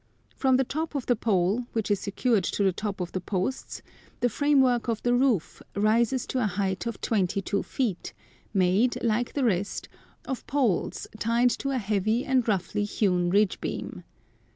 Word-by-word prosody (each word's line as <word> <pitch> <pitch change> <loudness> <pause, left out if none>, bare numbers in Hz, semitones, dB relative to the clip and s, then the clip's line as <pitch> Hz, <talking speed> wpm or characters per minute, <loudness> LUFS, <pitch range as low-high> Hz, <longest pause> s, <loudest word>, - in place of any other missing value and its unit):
From 260 -2 +3
the 265 - +3
top 310 +4 -4
of 275 - -2
the 245 - +3
pole, 215 +2 +1
which 220 -2 -1
is 200 - +2
secured 210 0 +1
to 205 - 0
the 190 -2 +3
top 205 +1 -4
of 175 - -4
the 185 - -3
posts, 195 +8 -3 0.4
the 245 - +2
framework 265 -2 +3
of 230 -2 -2
the 245 - +2
roof 245 - +1
rises 230 +5 +2
to 260 - -2
a 225 - +2
height 195 +2 -2
of 235 - -4
twenty 200 -4 +1
two 200 +1 -1
feet, 225 -10 -2 0.4
made, 195 +5 +2
like 235 +1 0
the 280 - 0
rest, 200 -4 -1 0.4
of 265 - -5
poles 255 -10 0
tied 235 +2 +3
to 275 - -2
a 270 - 0
heavy 215 +2 0
and 260 -3 +2
roughly 205 0 0
hewn 180 -4 +1
ridge 200 +1 +2
beam. 180 - -5
220 Hz, 175 wpm, -27 LUFS, 195-250 Hz, 0.4 s, From